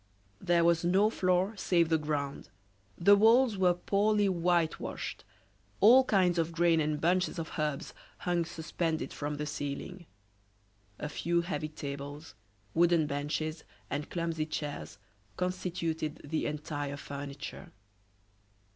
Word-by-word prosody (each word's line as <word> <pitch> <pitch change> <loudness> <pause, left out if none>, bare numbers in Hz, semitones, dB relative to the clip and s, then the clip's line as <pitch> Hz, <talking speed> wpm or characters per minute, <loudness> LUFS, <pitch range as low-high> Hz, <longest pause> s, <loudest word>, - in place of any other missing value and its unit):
There 170 -1 +3
was 170 0 +3
no 195 +5 +3
floor 185 +1 +1
save 170 -3 +2
the 160 -1 +3
ground; 145 -2 -3 0.5
the 200 +4 +6
walls 225 +3 +5
were 180 -2 +3
poorly 205 +3 +2
whitewashed; 170 -3 -1 0.6
all 250 +6 +7
kinds 180 -6 +3
of 165 0 -1
grain 165 0 +3
and 150 -1 0
bunches 180 +4 +1
of 165 -1 -5
herbs 150 -2 -2 0.2
hung 175 -1 0
suspended 165 -1 -3
from 145 0 -3
the 150 +1 -3
ceiling; 150 +5 -5 0.9
a - - -4
few 170 +3 0
heavy 170 -3 -3
tables, 145 +1 -7 0.4
wooden 170 -1 +4
benches, 150 +2 -3 0.3
and 145 +1 -3
clumsy 165 -3 -2
chairs 150 -7 -5 0.4
constituted 170 -4 -2
the 155 +2 -2
entire 145 -1 -4
furniture. 140 0 -7
165 Hz, 120 wpm, -31 LUFS, 150-180 Hz, 0.9 s, all